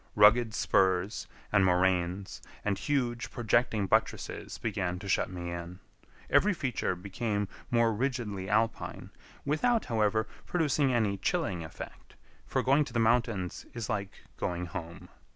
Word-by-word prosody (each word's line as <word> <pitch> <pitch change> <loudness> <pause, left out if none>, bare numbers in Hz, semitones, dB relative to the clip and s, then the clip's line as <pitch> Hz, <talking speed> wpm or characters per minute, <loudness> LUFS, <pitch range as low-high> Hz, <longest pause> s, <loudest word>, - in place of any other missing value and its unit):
Rugged 110 +2 +6
spurs, 95 +2 +2 0.2
and 100 -2 +5
moraines, 90 +1 +1 0.2
and 100 -1 +2
huge, 120 -2 -1
projecting 115 -2 +1
buttresses 95 - -1
began 95 -5 -2
to 100 - -8
shut 95 - +1
me 90 -1 -5
in. 85 +1 -6 0.5
Every 210 -1 +4
feature 125 - -1
became 100 +2 -2 0.2
more 115 -1 +3
rigidly 110 -6 -2
alpine, 110 +2 0 0.3
without, 225 +11 +2
however, 110 -1 +1 0.2
producing 150 -5 +2
any 110 -5 +1
chilling 95 - -1
effect; 80 - -10 0.3
for - - 0
going 140 +3 +4
to 125 - -10
the 120 - +1
mountains 115 -5 +1
is 115 -1 -4
like 100 -3 -3 0.2
going 90 0 -2
home. 85 -1 -7
105 Hz, 135 wpm, -30 LUFS, 95-120 Hz, 0.5 s, Rugged